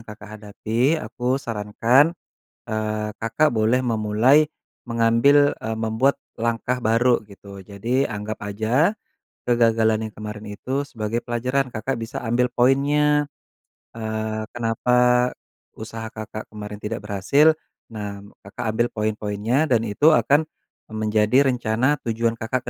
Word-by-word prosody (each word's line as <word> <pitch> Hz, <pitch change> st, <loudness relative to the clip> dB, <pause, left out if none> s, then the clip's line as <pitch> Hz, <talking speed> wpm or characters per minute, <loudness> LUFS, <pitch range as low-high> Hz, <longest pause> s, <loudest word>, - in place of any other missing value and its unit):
Kakak 105 Hz, -1 st, -11 dB
hadapi 115 Hz, +7 st, 0 dB
aku 125 Hz, -1 st, -2 dB
sarankan, 120 Hz, +6 st, +2 dB, 0.5 s
eee, 110 Hz, -1 st, -2 dB
Kakak 115 Hz, +8 st, +1 dB
boleh 115 Hz, +1 st, +2 dB
memulai 115 Hz, +5 st, +3 dB, 0.4 s
mengambil, 120 Hz, +5 st, +3 dB
eee, 110 Hz, +1 st, -4 dB
membuat 110 Hz, +5 st, 0 dB, 0.2 s
langkah 115 Hz, +2 st, -1 dB
baru 120 Hz, +1 st, +3 dB
gitu 100 Hz, -1 st, -13 dB
jadi 115 Hz, +8 st, -1 dB
anggap 105 Hz, +1 st, -5 dB
aja 110 Hz, -, +1 dB, 0.5 s
kegagalan 110 Hz, -2 st, +2 dB
yang -, -, -23 dB
kemarin 105 Hz, 0 st, -7 dB
itu 135 Hz, +5 st, -2 dB
sebagai 115 Hz, -4 st, -4 dB
pelajaran 125 Hz, +3 st, -1 dB
Kakak 115 Hz, +3 st, -3 dB
bisa 125 Hz, +3 st, -6 dB
ambil 120 Hz, +2 st, +1 dB
poinnya, 145 Hz, +3 st, +2 dB, 0.7 s
eee, 110 Hz, 0 st, -3 dB
kenapa 125 Hz, +1 st, +2 dB, 0.4 s
usaha 110 Hz, 0 st, -7 dB
Kakak 110 Hz, -1 st, -8 dB
kemarin 105 Hz, -1 st, -8 dB
tidak 105 Hz, 0 st, -5 dB
berhasil 105 Hz, +10 st, +3 dB, 0.4 s
nah 100 Hz, -2 st, -6 dB, 0.2 s
Kakak 110 Hz, +5 st, -6 dB
ambil 120 Hz, +2 st, +1 dB
poin-poinnya 110 Hz, +6 st, -1 dB
dan 120 Hz, -5 st, +2 dB
itu 145 Hz, +9 st, +4 dB
akan, 150 Hz, +2 st, +3 dB, 0.4 s
eee, 110 Hz, -, -10 dB
menjadi 110 Hz, +5 st, +3 dB
rencana 125 Hz, +4 st, 0 dB
tujuan 115 Hz, -1 st, -1 dB
Kakak 120 Hz, +3 st, -2 dB
115 Hz, 120 wpm, -22 LUFS, 110-125 Hz, 0.7 s, itu